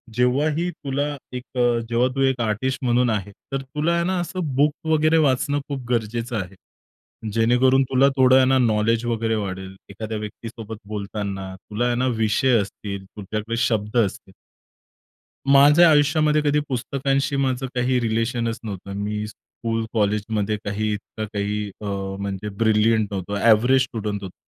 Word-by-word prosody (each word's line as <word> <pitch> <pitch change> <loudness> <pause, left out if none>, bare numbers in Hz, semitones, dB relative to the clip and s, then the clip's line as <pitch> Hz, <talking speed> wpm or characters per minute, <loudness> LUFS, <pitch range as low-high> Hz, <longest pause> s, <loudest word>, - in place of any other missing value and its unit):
"जेव्हाही 145 +7 +1
तुला 145 -2 -3 0.3
एक 125 +1 -8
अ, 120 -1 +3
जेव्हा 120 +2 +2
तू 135 - 0
एक 130 -2 +2
आर्टिस्ट 115 +5 -1
म्हणून 120 0 +2
आहे 105 -2 -2 0.2
तर 135 - -1
तुला 150 +5 -1
आहे 170 - +1
ना 185 0 0
असं 175 -5 -3
बुक 145 +2 +3
वगैरे 155 +1 +3
वाचणं 145 -1 +2
खूप 135 -3 -4
गरजेचं 115 +1 -1
आहे 95 +1 -10 0.8
जेणेकरून 125 +4 +4
तुला 135 +1 +4
थोडं 130 0 +6
आहे 130 - +5
ना 130 +1 +3
नॉलेज 115 0 +2
वगैरे 115 -1 0
वाढेल, 95 -2 -5
एखाद्या 110 +2 -5
व्यक्तीसोबत 110 +1 -8
बोलताना 100 -2 -4
तुला 105 +5 -4
आहे 120 - +1
ना 125 +2 +1
विषय 115 +3 +3
असतील, 100 0 -6
तुझ्याकडे 105 +3 -5
शब्द 110 -2 0
असतील." 100 -3 -1 1.2
माझ्या 150 +5 +7
आयुष्यामध्ये 150 0 +3
कधी 150 0 +2
पुस्तकांशी 135 +2 -1
माझं 135 -1 0
काही 125 0 +1
रिलेशनच 115 0 -1
नव्हतं. 100 -2 -6
मी 105 +1 -2
स्कूल, 115 +1 -5
कॉलेजमध्ये 105 0 0
काही 105 +1 -1
इतकं 110 +1 -6
काही 105 0 -2
अ, - - -6 0.3
म्हणजे 100 +1 -4
ब्रिलियंट 110 0 +3
नव्हतो, 95 +1 -4
एव्हरेज 125 +5 +5
स्टुडंट 105 -5 -3
होतो. 95 -2 -7
115 Hz, 150 wpm, -23 LUFS, 105-135 Hz, 1.2 s, माझ्या